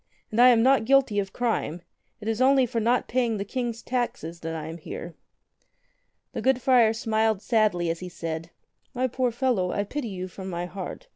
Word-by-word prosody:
And 225 +3 +3
I 250 - +9
am 235 -2 +6
not 260 -3 +4
guilty 265 -5 +3
of 195 -1 -3
crime. 205 -8 -2 0.4
It 210 - -7
is 225 +2 -1
only 265 0 +5
for 235 -1 -2
not 235 +3 +1
paying 235 -3 0
the 200 - -3
King's 235 0 -3
taxes 175 -10 -3
I 160 -1 -4
am 165 +2 -7
here." 170 +2 -7 1.2
The - - -3
good 265 -1 +2
friar 245 -3 +5
smiled 220 -2 0
sadly 210 -7 +2
as 165 - -5
he 180 - -7
said: 165 -1 -5 0.5
"My 255 +1 +1
poor 255 0 0
fellow, 235 -7 0
I 205 - 0
pity 270 +5 -4
you 185 -2 -5
from 190 +1 -8
my 175 -1 -3
heart. 190 - -7
220 Hz, 195 wpm, -26 LUFS, 180-250 Hz, 1.2 s, I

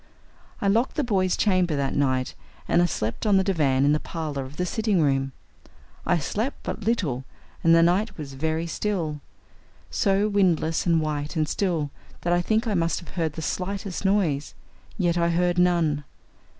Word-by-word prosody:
I 200 - +1
locked 230 +6 +2
the 300 - +1
boys' 190 -6 +1
chamber 185 -6 +2
that 140 -1 -1
night, 130 -2 0 0.3
and - - +3
I - - +4
slept 115 - -3
on 200 -2 +5
the 190 - +3
divan 140 -8 +2
in 145 - +4
the 150 - +1
parlor 150 -6 -4
off 140 - -13
the 180 - -1
sitting 215 0 0
room. 135 -3 +1 0.8
I 175 - +3
slept 215 - -3
but 215 - -5
little, 160 - 0 0.4
and 165 0 +6
the 165 - +6
night 190 +5 +1
was 145 -4 -7
very 160 +4 -1
still 165 -5 -2 0.7
so 200 -2 +2
windless 180 -5 +1
and 165 -2 +3
white 150 0 -3
and 155 -2 +1
still 165 -5 -1 0.3
that 175 - +1
I 175 - +3
think 220 +6 +1
I 220 - 0
must 165 -3 +1
have 170 - -12
heard 165 -4 -2
the 160 - -6
slightest 195 +2 -3
noise. 185 -8 +1 0.4
Yet 175 -3 +1
I 170 0 +2
heard 175 +1 +1
none. 170 -5 +2
170 Hz, 180 wpm, -25 LUFS, 150-195 Hz, 0.8 s, and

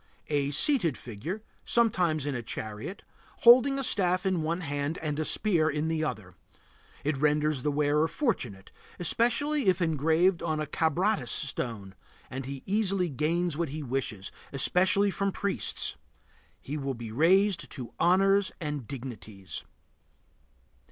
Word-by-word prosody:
A 145 -2 +1
seated 170 - +2
figure, 155 - -6 0.2
sometimes 180 - +2
in 145 - -1
a 120 - -3
chariot, 110 - -6 0.4
holding 255 +3 +7
a 275 - -1
staff 185 -5 +1
in 185 -3 +1
one 165 +3 -2
hand 145 0 -3
and 150 -1 -3
a - - +1
spear 165 -2 +2
in 155 +1 -1
the 160 -1 -1
other. 105 -11 -4 0.7
It 145 +1 0
renders 150 -1 +1
the 150 - 0
wearer 150 +2 +2
fortunate, 130 - -3 0.3
especially 245 - +1
if 185 -1 +4
engraved 165 +2 +2
on 155 -2 -1
a 155 - -1
Kabratis 170 +8 0
stone, 115 -8 -2 0.4
and 130 0 -5
he 135 -1 -6
easily 195 -3 0
gains 160 +3 0
what 170 -3 -1
he 150 +2 -5
wishes, 120 -7 -3 0.2
especially 190 +8 +4
from 200 +1 -1
priests. 200 +1 -2 0.6
He 145 +3 -5
will 135 -2 -3
be 115 -2 -7
raised 170 - +3
to 125 -3 -7
honors 195 +3 +3
and 150 -7 -4
dignities. 115 -7 -7
155 Hz, 140 wpm, -28 LUFS, 140-190 Hz, 0.7 s, holding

